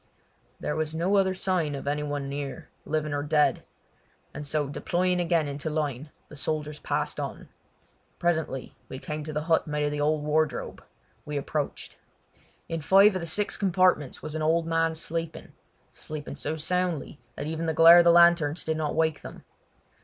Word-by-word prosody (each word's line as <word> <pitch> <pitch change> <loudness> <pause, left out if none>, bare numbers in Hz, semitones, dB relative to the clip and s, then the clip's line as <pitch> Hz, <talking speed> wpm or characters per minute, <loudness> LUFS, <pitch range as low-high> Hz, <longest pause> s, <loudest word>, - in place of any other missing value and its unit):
There - - -3
was 155 0 -2
no 180 +5 +1
other 190 -1 +2
sign 180 -6 0
of 140 - -7
any 145 +1 0
one 145 -1 -3
near, 140 +3 -6 0.2
living 155 -1 -2
or 145 - -1
dead; 150 0 +2 0.7
and 150 0 -6
so 150 -1 0
deploying 180 +5 0
again 170 -3 +1
into 145 +2 -4
line 150 -2 -3 0.2
the - - -12
soldiers 150 +1 -3
passed - - -2
on. - - -6 0.7
Presently 160 -6 -2
we 130 - -6
came 150 +3 -5
to 155 - -6
the 150 0 -2
hut 160 0 +1
made 150 0 -1
of 145 - -1
the 145 0 -2
old 150 0 +1
wardrobe. 155 +1 -1 0.4
We 150 -1 -4
approached. 145 +1 -4 0.7
In 165 -1 -3
five 195 +6 +6
of 185 - -3
the 170 - -5
six 200 +5 0
compartments 185 -7 +1
was 155 - -5
an 155 - -3
old 160 +2 +2
man 165 0 +1
sleeping—sleeping 160 -2 -7
so 155 +2 -2
soundly 165 -2 -1 0.2
that 145 - -5
even 160 +1 -3
the 160 - 0
glare 165 +2 +9
of - - +6
the 170 - +7
lanterns 170 -2 +4
did 160 0 -1
not 155 -1 -2
wake 160 -1 +1
them. - - -10
155 Hz, 175 wpm, -27 LUFS, 150-170 Hz, 0.7 s, glare